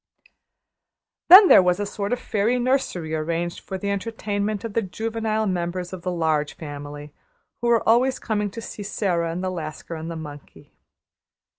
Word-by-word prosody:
Then 380 Hz, +3 st, +11 dB
there -, -, +8 dB
was 180 Hz, +1 st, +1 dB
a 205 Hz, -, -1 dB
sort 200 Hz, +1 st, -4 dB
of 245 Hz, -, +1 dB
fairy 220 Hz, +3 st, 0 dB
nursery 245 Hz, -, -1 dB
arranged 165 Hz, +2 st, -2 dB
for 190 Hz, -, -6 dB
the 200 Hz, +2 st, -2 dB
entertainment 205 Hz, 0 st, -2 dB
of 225 Hz, -3 st, -5 dB
the 230 Hz, -, +1 dB
juvenile 220 Hz, +2 st, -2 dB
members 180 Hz, -1 st, -3 dB
of 185 Hz, -, -6 dB
the 180 Hz, -, -3 dB
Large 160 Hz, -3 st, 0 dB
Family, 145 Hz, -1 st, -8 dB, 0.5 s
who 240 Hz, -, 0 dB
were 235 Hz, -1 st, +2 dB
always 255 Hz, +4 st, +4 dB
coming 210 Hz, -2 st, -2 dB
to 230 Hz, +4 st, -8 dB
see 210 Hz, -, -8 dB
Sara 180 Hz, -5 st, -1 dB
and 175 Hz, +3 st, -4 dB
the 185 Hz, -, -1 dB
Lascar 160 Hz, -1 st, -6 dB
and 160 Hz, 0 st, -6 dB
the 165 Hz, -, -5 dB
monkey. 145 Hz, -3 st, -11 dB
190 Hz, 170 wpm, -23 LUFS, 165-220 Hz, 0.5 s, Then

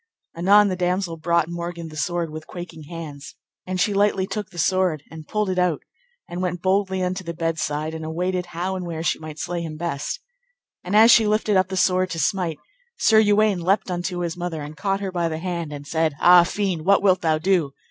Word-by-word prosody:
Anon 200 Hz, +4 st, +5 dB
the 185 Hz, -, -1 dB
damosel 180 Hz, -1 st, -1 dB
brought 170 Hz, +1 st, +1 dB
Morgan 170 Hz, -1 st, -5 dB
the 155 Hz, -, -11 dB
sword 170 Hz, +1 st, -2 dB
with 155 Hz, 0 st, -8 dB
quaking 170 Hz, -3 st, -9 dB
hands, 150 Hz, -3 st, -8 dB, 0.3 s
and 185 Hz, 0 st, -2 dB
she 205 Hz, +2 st, +2 dB
lightly 200 Hz, -1 st, +2 dB
took 200 Hz, 0 st, -5 dB
the 175 Hz, -, -14 dB
sword, 175 Hz, -3 st, +1 dB
and 160 Hz, -1 st, -10 dB
pulled 210 Hz, -1 st, -1 dB
it 185 Hz, -1 st, -1 dB
out, 180 Hz, -4 st, +1 dB, 0.4 s
and 175 Hz, +1 st, -5 dB
went 180 Hz, -1 st, -3 dB
boldly 190 Hz, 0 st, +1 dB
unto 185 Hz, +1 st, -2 dB
the 170 Hz, -1 st, -6 dB
bed's 165 Hz, 0 st, -1 dB
side, 150 Hz, +2 st, -2 dB
and 160 Hz, 0 st, -6 dB
awaited 180 Hz, +3 st, -2 dB
how 175 Hz, +2 st, -3 dB
and 180 Hz, -2 st, -5 dB
where 165 Hz, -1 st, -4 dB
she 165 Hz, -, 0 dB
might 155 Hz, -1 st, -8 dB
slay 175 Hz, 0 st, -3 dB
him 160 Hz, -2 st, -6 dB
best. 165 Hz, -, -3 dB, 0.6 s
And 180 Hz, +3 st, -2 dB
as 225 Hz, +2 st, +8 dB
she 225 Hz, -2 st, +6 dB
lifted 210 Hz, 0 st, +1 dB
up 185 Hz, 0 st, +3 dB
the 190 Hz, 0 st, -4 dB
sword 185 Hz, 0 st, +2 dB
to 165 Hz, -, -4 dB
smite, 180 Hz, -5 st, 0 dB, 0.4 s
Sir 220 Hz, -1 st, +5 dB
Uwaine 205 Hz, -3 st, +3 dB
leapt 190 Hz, +2 st, +1 dB
unto 175 Hz, 0 st, -3 dB
his 170 Hz, -2 st, -2 dB
mother, 175 Hz, -3 st, -4 dB
and 150 Hz, +1 st, -8 dB
caught 195 Hz, +3 st, -1 dB
her 195 Hz, -2 st, -3 dB
by 170 Hz, -2 st, -1 dB
the 160 Hz, -, -3 dB
hand, 170 Hz, -2 st, -4 dB
and 145 Hz, -1 st, -7 dB
said, 160 Hz, -1 st, 0 dB
Ah, 175 Hz, 0 st, +8 dB
fiend, 185 Hz, -4 st, -2 dB
what 200 Hz, +3 st, +4 dB
wilt 185 Hz, -2 st, +4 dB
thou 160 Hz, -2 st, +2 dB
do? 165 Hz, -4 st, +1 dB
175 Hz, 220 wpm, -23 LUFS, 165-190 Hz, 0.6 s, as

